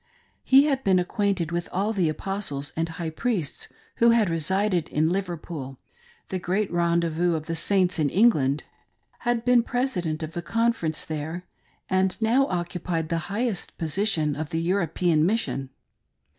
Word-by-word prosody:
He 270 +2 +6
had 275 -3 0
been 190 -2 +4
acquainted 180 -2 0
with 170 0 -2
all 205 +4 0
the 180 -6 +1
Apostles 155 -4 -3
and 165 +1 -1
High 165 0 -4
priests 185 - -2 0.3
who 235 - +5
had 225 -6 +3
resided 180 +2 +1
in 155 +2 +1
Liverpool 170 -7 -4 0.3
— 475 0 -30
the 185 - -2
great 190 +4 -1
rendezvous 170 0 +1
of 155 -1 -4
the 165 - -3
Saints 185 +1 +2
in 150 -2 +2
England; 150 - +3 0.6
had 240 -1 -1
been 245 -1 +5
President 185 -11 -1
pf 155 0 -4
the 175 - -4
Confer 230 -1 0
ence 155 - 0
there, 160 +3 -5 0.4
and 190 0 +1
now 240 +5 +3
occupied 175 -2 -2
the 165 -1 0
highest 215 -1 -2
position 165 -2 0
of 155 +1 -4
the 165 - -1
European 170 -2 +1
mission. 170 - 0
175 Hz, 155 wpm, -25 LUFS, 160-205 Hz, 0.6 s, He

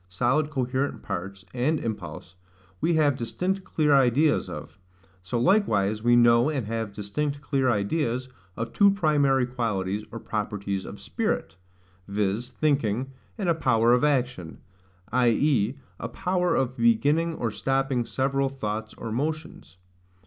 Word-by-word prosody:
solid 125 +10 +1
coherent 130 0 -2
parts 95 0 -5
and 140 +5 +1
impulse, 110 -5 -6 0.5
we 170 - +1
have 150 -3 +3
distinct 180 - -2
clear 155 -5 +1
ideas 140 +3 +3
of: - - -8 0.4
so 95 +6 -2
likewise 110 - +2
we 120 +1 +4
know, 120 +2 +5
and 140 -7 -2
have 110 -1 -3
distinct 140 +9 -3
clear 135 -3 0
ideas, 120 +4 0 0.3
of 115 0 -4
two 200 -1 +6
primary 145 -8 +2
qualities 105 -5 -2
or 115 - -6
properties 100 -3 -3
of - - -9
spirit, 80 0 -2 0.5
viz. 105 +4 -1
thinking, 130 -2 0 0.3
and 200 -4 -2
a 170 - +4
power 120 -7 +3
of 125 - +3
action; 125 - 0 0.5
i.e. 125 0 +2 0.2
a - - -4
power 180 -2 0
of 130 -1 0
beginning 145 +9 +2
or 115 -6 -2
stopping 135 0 0
several 135 +2 0
thoughts 110 -5 -4
or 115 - -6
motions. 145 - -4
125 Hz, 135 wpm, -26 LUFS, 110-145 Hz, 0.5 s, two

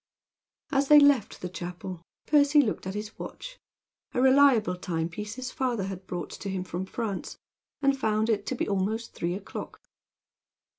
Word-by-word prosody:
As 275 -1 +2
they 300 +1 +9
left 285 -6 +3
the - - -1
chapel 180 0 -7 0.2
Percy 295 0 +5
looked 220 -8 +1
at 190 - -4
his 210 +1 -6
watch, - - -8 0.6
a - - +2
reliable 260 -7 +5
time 165 -2 -2
piece 210 +4 -6
his 255 0 -5
father 250 -7 -1
had 190 -1 -6
brought 175 -3 -5
to 200 - -6
him 190 -1 -2
from 180 +1 -5
France, 210 -2 -4 0.5
and 275 0 +4
found 220 -4 +1
it 210 -3 0
to 260 - -1
be - - -2
almost 205 +3 -1
three 175 +1 -2
o'clock. 195 - -7
210 Hz, 165 wpm, -28 LUFS, 185-260 Hz, 0.6 s, they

